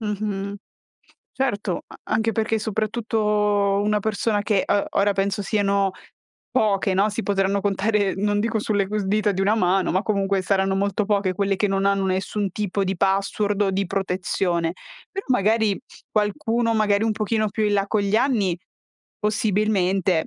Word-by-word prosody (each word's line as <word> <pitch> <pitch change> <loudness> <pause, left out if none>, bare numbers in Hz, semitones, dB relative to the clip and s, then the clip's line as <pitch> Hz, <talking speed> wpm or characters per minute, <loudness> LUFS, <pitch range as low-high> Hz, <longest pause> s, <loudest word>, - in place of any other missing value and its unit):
Mh-mh. 205 -2 -3 0.8
Certo, 210 -8 -2
a - - -13 0.2
anche 225 +1 +1
perché 225 +1 0
soprattutto 210 -2 0
una 210 0 +1
persona 215 0 0
che, 205 -2 +1
ehm, 200 - +2
ora 200 +1 +2
penso 200 +1 -1
siano 200 -2 +1 0.6
poche, 205 -6 +1
no, 195 +3 +3
si 210 +2 -3
potranno 200 -1 +1
contare 205 0 +1
non 205 +1 +1
dico 225 +1 0
sulle 205 -2 0
cu 210 +1 -1
dita 210 +1 +1
di 190 - -3
una 200 +3 +3
mano, 185 -2 +2
ma 185 - +1
comunque 195 -2 0
saranno 190 0 +1
molto 200 +1 0
poche 200 -3 +1
quelle 195 0 0
che 205 +2 +1
non 195 0 0
hanno 200 -1 +2
nessun 190 +2 -1
tipo 200 0 -2
di 190 0 -2
password 195 +2 +1
o 195 - +2
di 195 +1 -1
protezione. 180 -3 -1 0.4
Però 390 - -5
magari 220 -3 +2 0.3
qualcuno 225 +2 0
magari 210 -1 +2
un 225 - +1
pochino 215 0 0
più 215 +2 -2
in 210 - +1
là 200 -1 +1
con 215 +1 0
gli 200 +2 +1
anni, 225 -9 +1 0.6
possibilmente 195 -5 +1
205 Hz, 165 wpm, -23 LUFS, 195-215 Hz, 0.8 s, no